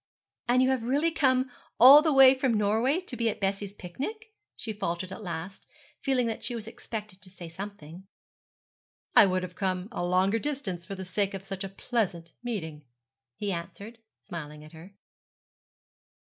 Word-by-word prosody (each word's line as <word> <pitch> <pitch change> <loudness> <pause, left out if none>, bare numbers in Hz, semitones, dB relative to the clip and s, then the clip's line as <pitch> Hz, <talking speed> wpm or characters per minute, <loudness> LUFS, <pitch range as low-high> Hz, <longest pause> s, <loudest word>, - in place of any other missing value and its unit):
'And 250 +1 +4
you 260 - +3
have 260 -2 0
really 285 +8 +1
come 260 -5 +2 0.3
all 270 +5 +11
the 315 0 +2
way 270 -1 +8
from 260 -3 +1
Norway 220 - +2
to 360 - -7
be 230 -1 +1
at 210 - -4
Bessie's 195 0 -2
picnic?' 425 - -6 0.2
she 220 - -4
faltered 185 -2 -3
at 190 - -7
last, 175 0 -6 0.3
feeling 260 -3 +1
that 225 -1 -3
she 240 - -3
was 225 -2 -7
expected 215 -4 -7
to 185 - -9
say 180 -2 -9
something. 185 -1 -9 1.1
'I 205 - +9
would 185 0 0
have 180 -1 -6
come 185 -1 -2
a 205 - -3
longer 185 +5 +2
distance 210 -12 -4
for 195 - -5
the 190 0 -6
sake 195 +2 -1
of 195 0 -8
such 195 0 -5
a 195 - -4
pleasant 190 -5 -2
meeting,' 160 -11 -5 0.5
he 205 -1 -3
answered, 200 +6 -7 0.2
smiling 150 -5 -8
at 155 - -13
her. 170 +5 -13
200 Hz, 175 wpm, -28 LUFS, 185-245 Hz, 1.1 s, all